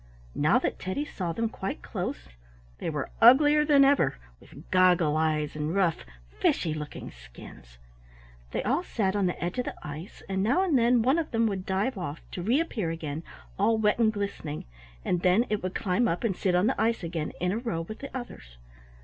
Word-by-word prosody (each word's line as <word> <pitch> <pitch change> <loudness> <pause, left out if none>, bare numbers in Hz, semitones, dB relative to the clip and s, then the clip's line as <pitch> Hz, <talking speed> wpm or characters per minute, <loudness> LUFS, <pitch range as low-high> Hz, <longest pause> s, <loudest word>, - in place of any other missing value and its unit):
Now 155 +11 +3
that 255 - -2
Teddy 185 +11 -3
saw 180 - -4
them 230 +7 -1
quite 195 -3 -5
close - - -5 0.5
they - - -3
were 150 -4 -4
uglier 290 +6 +7
than 285 -2 +5
ever, 275 - +3 0.2
with 145 +5 -15
goggle 180 -4 +4
eyes, 155 -1 0
and 150 +3 -2
rough, 185 -5 +1 0.3
fishy 155 - +1
looking 150 -1 -7
skins. - - -14 0.7
They - - -2
all 270 +10 +1
sat 205 - -1
on 200 -2 +2
the 180 - -3
edge 175 +7 -2
of 250 - -1
the - - -5
ice, 155 +6 -8
and 190 0 -1
now 250 - +2
and 350 -6 +1
then 240 -1 +4
one 265 +7 +3
of 315 - -3
them 230 0 +1
would 195 -4 -2
dive 195 +4 -1
off, 155 -3 -5
to 180 - -5
reappear 230 - 0
again, 160 -2 -4 0.4
all 220 +3 +3
wet 210 +1 +2
and 220 -2 +4
glistening, 200 -8 -4 0.4
and 175 - 0
then 185 +7 +4
it 210 - 0
would 185 0 -4
climb 215 +4 +1
up 175 +1 -1
and 215 -6 0
sit 180 -1 0
on 180 +2 +3
the 260 -1 +1
ice 225 -2 +1
again 165 -2 -3
in 180 +1 0
a 215 - -1
row 230 -9 -2
with 215 +7 -8
the 275 - -7
others. - - -10
190 Hz, 200 wpm, -27 LUFS, 165-235 Hz, 0.7 s, uglier